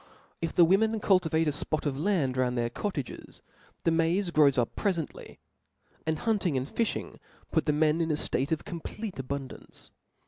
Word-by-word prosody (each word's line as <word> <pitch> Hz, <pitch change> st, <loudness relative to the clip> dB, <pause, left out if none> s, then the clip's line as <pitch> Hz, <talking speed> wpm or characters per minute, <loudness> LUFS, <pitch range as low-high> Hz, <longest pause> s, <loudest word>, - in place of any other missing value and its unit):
If 165 Hz, -1 st, -2 dB
the 175 Hz, -, +6 dB
women 220 Hz, +5 st, +3 dB
cultivate 165 Hz, -6 st, +2 dB
a -, -, +3 dB
fpof 155 Hz, +2 st, -2 dB
of 145 Hz, -2 st, 0 dB
land 150 Hz, -5 st, +1 dB
round 125 Hz, -1 st, +1 dB
their 120 Hz, 0 st, 0 dB
cottages, 150 Hz, -, -5 dB, 0.4 s
tl^e 165 Hz, -, +4 dB
maiz 175 Hz, +3 st, +1 dB
grows 145 Hz, -3 st, +5 dB
up 120 Hz, -2 st, 0 dB
prefently 175 Hz, -7 st, -2 dB
•, -, -, -16 dB, 0.7 s
and 160 Hz, 0 st, +1 dB
hunting 195 Hz, -8 st, 0 dB
and 130 Hz, +1 st, -2 dB
fi(h 230 Hz, +7 st, 0 dB
ing -, -, -7 dB, 0.3 s
puts -, -, +1 dB
the 150 Hz, -, +2 dB
men 155 Hz, +2 st, +2 dB
in 165 Hz, -, 0 dB
a 155 Hz, -, +2 dB
ftate 135 Hz, -2 st, -1 dB
pf 160 Hz, 0 st, -2 dB
complete 195 Hz, +3 st, -6 dB
abun 135 Hz, +1 st, -3 dB
(3ance. -, -, -13 dB
160 Hz, 185 wpm, -29 LUFS, 140-185 Hz, 0.7 s, the